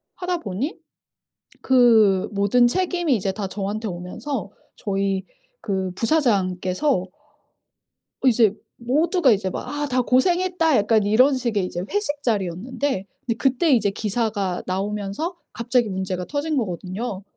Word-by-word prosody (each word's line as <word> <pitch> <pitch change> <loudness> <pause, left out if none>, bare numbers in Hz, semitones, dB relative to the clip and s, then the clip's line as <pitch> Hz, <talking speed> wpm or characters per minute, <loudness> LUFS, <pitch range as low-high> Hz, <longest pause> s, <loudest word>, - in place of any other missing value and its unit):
하다 360 -1 -2
보니 230 - -3 0.8
그 225 -7 +4
모든 200 +5 +3
책임이 350 -2 +1
이제 195 -2 -1
다 195 0 -4
저한테 205 +3 -4
오면서 195 +5 -5 0.3
저희 195 -1 -1 0.4
그 190 -3 -2
부사장께서 195 - +1 1.2
이제 225 -4 +4 0.2
모두가 290 - +2
이제 195 -2 +1
막 - - -6
'아 290 0 -3
다 255 -1 +1
고생했다.' 335 +4 +2
약간 215 0 +3
이런 250 +7 +4
식의 225 -7 -1
이제 175 0 -4
회식 295 -9 -2
자리였는데 215 +3 -1 0.3
그때 275 +4 +2
이제 215 -5 +3
기사가 205 -3 -2
나오면서 205 - -3 0.2
갑자기 240 -2 +1
문제가 185 -1 -3
터진 295 +1 -2
거거든요. 190 0 -4
220 Hz, 275 characters per minute, -23 LUFS, 195-275 Hz, 1.2 s, 그